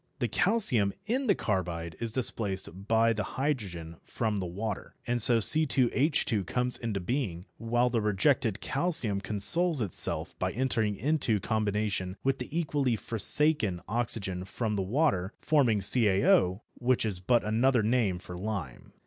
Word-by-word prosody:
The 125 -3 -2
calcium 125 - +1
in 255 +5 -2
the 205 - +3
carbide 85 -5 -4
is 115 -1 -4
displaced 100 -5 -2
by 115 0 +2
the 110 - -4 0.2
hydrogen 95 - -4
from 110 -3 -3
the 95 -2 -4
water, 100 +4 -6
and 120 0 -1
so 120 +2 +6
C_H_ 130 - +3
comes 125 0 -3
into 110 -4 -4
being, 95 -4 -4
while 120 +2 0
the 115 -2 -1
rejected 105 +1 0
calcium 135 - +2
consoles 155 - +5
itself 105 -7 +3
by - - -2
entering 110 -4 -1
into 130 -2 0
combination 105 -3 -3
with 135 0 -1
the 125 - -7
equally 140 -6 -1
forsaken 115 - +1
oxygen 100 -5 -3
from 105 +3 -4
the 100 - -2
water, 100 - -1
forming 125 -9 +1
CaO, 95 -3 +2 0.2
which 125 -1 0
is 100 -5 -2
but 120 +6 +1
another 115 +2 +1
name 110 -5 0
for 90 0 -11
lime. 95 - -7
110 Hz, 145 wpm, -28 LUFS, 100-130 Hz, 0.2 s, so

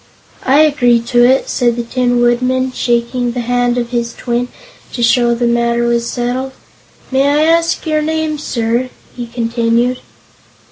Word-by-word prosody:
"I 275 +3 +5
agree 255 -6 +3
to 240 +1 +2
it," 260 +2 +3
said 240 -3 0
the 240 - -3
Tin 245 0 0
Woodman, 255 +2 +1
shaking 240 0 -1
the 245 - -3
hand 245 0 0
of 240 0 -3
his 235 -1 -2
twin 245 0 -2 0.5
to 240 - -2
show 235 0 +3
the 240 +1 -1
matter 235 0 +1
was 235 0 0
settled. 255 +2 -3 0.6
"May 270 +1 +2
I 295 +1 +2
ask 330 +2 +1
your 310 -1 0
name, 315 -1 -2
sir?" 235 -2 -2 0.3
he 240 -1 -6
continued. 235 +1 0
245 Hz, 155 wpm, -15 LUFS, 235-260 Hz, 0.6 s, I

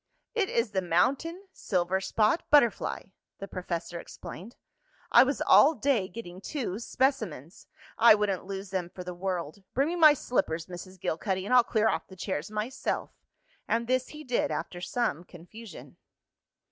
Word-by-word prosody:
"It 420 -5 0
is 230 -2 0
the 190 -2 0
mountain 275 - 0
silverspot 190 - +1
butterfly," 260 -7 +3 0.3
the 195 - -7
professor 175 -2 -5
explained. 205 +8 -10 0.6
"I 240 - +8
was 270 +2 +1
all 310 +3 +6
day 260 -9 +1
getting 185 -3 -9
two 225 -7 -4
specimens. 220 - -2 0.3
I 230 -1 +8
wouldn't 205 -3 -1
lose 195 0 -6
them 180 -3 -2
for 180 - -9
the 180 0 -6
world. 180 -1 -4
Bring 275 +4 +2
me 345 - -2
my 310 -4 +7
slippers, 170 - -1
Mrs. 185 +1 -10
Gilcuddy, 190 +3 -2
and 250 - -1
I'll 250 -1 +7
clear 220 -2 +1
off - - -1
the 190 - -13
chairs 180 -3 -4
myself," 215 +5 -3 0.6
and 230 +1 0
this 255 +1 0
he 305 0 -10
did 265 +3 0
after 175 - -4
some 185 -6 -1
confusion. 180 +4 -12
205 Hz, 155 wpm, -28 LUFS, 180-250 Hz, 0.6 s, I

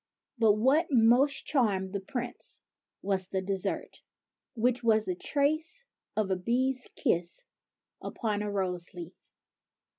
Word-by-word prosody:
But 220 -3 +5
what 265 +10 +3
most 255 +2 +4
charmed 200 -9 +1
the 200 - -1
Prince 245 +5 -4 0.4
was 190 -2 0
the 190 - -1
desert, 195 -1 -1 0.5
which 245 +1 +1
was 220 -2 +3
the 185 - -1
trace 310 - 0 0.3
of 210 -3 +1
a - - +3
bee's 250 +7 0
kiss 175 0 0 0.6
upon 210 -3 -2
a 210 - -2
rose 185 -3 -2
leaf. 175 0 -11
215 Hz, 125 wpm, -29 LUFS, 190-255 Hz, 0.6 s, But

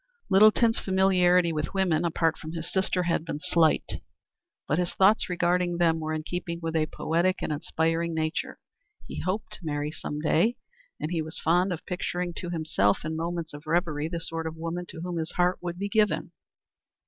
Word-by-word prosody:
Littleton's 215 +3 +5
familiarity 180 -2 +3
with 150 +4 -3
women, 175 -4 +2
apart 165 -1 +1
from 160 0 -8
his 165 -1 -5
sister, 190 -1 +1
had 170 -2 0
been 165 -3 -4
slight, 160 0 +2 0.7
but 150 - +1
his 175 -1 -1
thoughts 195 +2 +4
regarding 175 0 +1
them 165 -2 +3
were 155 0 -3
in 155 0 -2
keeping 170 0 -4
with 165 -1 -3
a 155 -1 +2
poetic 170 +5 0
and 155 - -1
aspiring 165 +2 -1
nature. 155 0 -2 0.5
He - - -6
hoped 190 +4 -2
to - - -7
marry 150 -2 -2
some 150 -2 -5
day, 170 +9 +2 0.4
and 155 - -3
he 165 -2 0
was 160 0 -6
fond 180 +4 +2
of 170 -2 -5
picturing 180 -1 -3
to 175 - -4
himself 155 - +1
in 160 +1 -2
moments 165 -1 -3
of 145 +1 -10
reverie 155 -2 0
the 170 0 -3
sort 165 0 -4
of 160 0 -6
woman 170 +2 -4
to 160 - -7
whom 175 0 -3
his 160 -1 -3
heart 180 0 +2
would 175 -1 -4
be 200 +2 -2
given. 210 0 +1
170 Hz, 190 wpm, -27 LUFS, 160-180 Hz, 0.7 s, Littleton's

